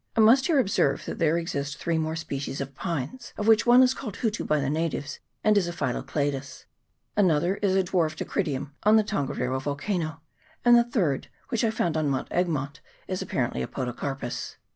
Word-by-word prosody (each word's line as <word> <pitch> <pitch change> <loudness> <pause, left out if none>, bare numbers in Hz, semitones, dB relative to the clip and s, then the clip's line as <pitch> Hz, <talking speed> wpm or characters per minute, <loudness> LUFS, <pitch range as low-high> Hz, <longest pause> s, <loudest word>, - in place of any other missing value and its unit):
I - - 0
must 235 +5 +6
here 325 -4 +3
observe 195 - +2
that - - -5
there 165 0 +3
exist 140 -4 -3
three 165 -1 -1
more 160 0 -1
species 140 -3 -4
of 140 0 -5
pines, 170 - -4
of 210 - -2
which 225 +1 +5
one 245 +2 +8
is 255 0 +4
called 220 -8 -6
hutu 225 -2 -1
by 150 - +2
the 140 - -1
natives, 150 -2 -2 0.2
and 215 0 +4
is 195 -4 +3
a - - -2
Phyllocladus; 135 -1 -3 0.5
another 180 -1 +3
is 195 -2 +1
a 190 - +3
dwarf 170 -3 0
Dacrydium, 145 -7 -2
on 215 +1 +5
the 220 - +5
Ton 170 -10 -1
gariro 130 +1 -2
volcano; 160 +3 -2 0.4
and 240 0 +8
the 235 - +6
third, 180 - 0 0.2
which 235 -3 0
I 225 - +3
found 175 -7 0
on 155 -2 +1
Mount 135 -1 -2
Egmont, 150 -6 -1 0.3
is - - -3
apparently 65 - -1
a 65 - -2
Podocarpus. 130 0 -4
165 Hz, 195 wpm, -26 LUFS, 140-210 Hz, 0.5 s, one